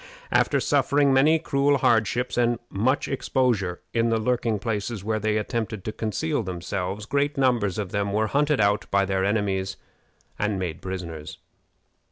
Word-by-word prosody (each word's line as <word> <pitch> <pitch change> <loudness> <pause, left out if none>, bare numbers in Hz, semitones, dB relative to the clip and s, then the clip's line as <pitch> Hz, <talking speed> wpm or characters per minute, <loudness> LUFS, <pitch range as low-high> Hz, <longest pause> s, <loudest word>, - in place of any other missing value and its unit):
After - - +3
suffering 140 -1 +2
many 150 +5 +5
cruel 140 -2 +2
hardships 120 -1 +1
and 120 -1 +2
much 130 +8 +1
exposure 120 -9 0
in 115 0 +2
the 115 - +2
lurking 115 -1 0
places 105 0 -3
where 110 +1 -1
they 110 0 0
attempted 110 -2 -3
to 110 - -2
conceal 120 +8 -2
themselves, 95 +1 -4
great 145 +4 0
numbers 120 -8 +2
of 100 -4 -3
them 100 -1 -1
were 110 +2 +1
hunted 145 +5 +1
out 100 0 +2
by 100 0 +2
their 95 -1 0
enemies 95 -2 0 0.6
and 105 -1 0
made 90 -3 -4
prisoners. 85 -5 -6
110 Hz, 155 wpm, -25 LUFS, 100-125 Hz, 0.6 s, many